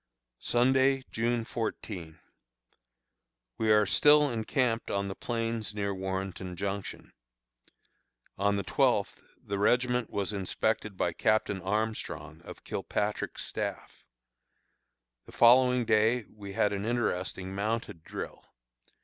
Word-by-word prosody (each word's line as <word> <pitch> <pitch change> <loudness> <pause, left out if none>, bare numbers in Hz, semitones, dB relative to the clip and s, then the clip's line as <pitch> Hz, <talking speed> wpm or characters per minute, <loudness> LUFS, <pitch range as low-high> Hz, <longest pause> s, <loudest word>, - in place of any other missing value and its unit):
Sunday, 130 +2 +3
June 115 0 0
14. 95 -8 -5 1.4
We 110 -1 +3
are 105 0 +5
still 150 +6 +5
encamped 115 +1 0
on 100 0 -1
the 95 - -4
plains 115 -1 -3
near 100 -1 -1
Warrenton 95 -1 -4
Junction. 100 +2 -5 1.2
On 100 +1 +1
the 100 - -1
twelfth - - +1 0.2
the 100 0 -4
regiment 125 +2 +2
was 100 +1 -2
inspected 105 +1 -1
by 85 - 0
Captain 105 -3 +1
Armstrong, 105 -5 -3
of - - -11
Kilpatrick's 105 0 -3
staff. - - -5 1.2
The - - -13
following 125 +1 +5
day 110 +2 +3
we 100 -2 -9
had 105 +1 +2
an 100 0 -3
interesting 95 -5 -2
mounted 105 -4 -3
drill. - - -7
105 Hz, 110 wpm, -30 LUFS, 100-120 Hz, 1.4 s, are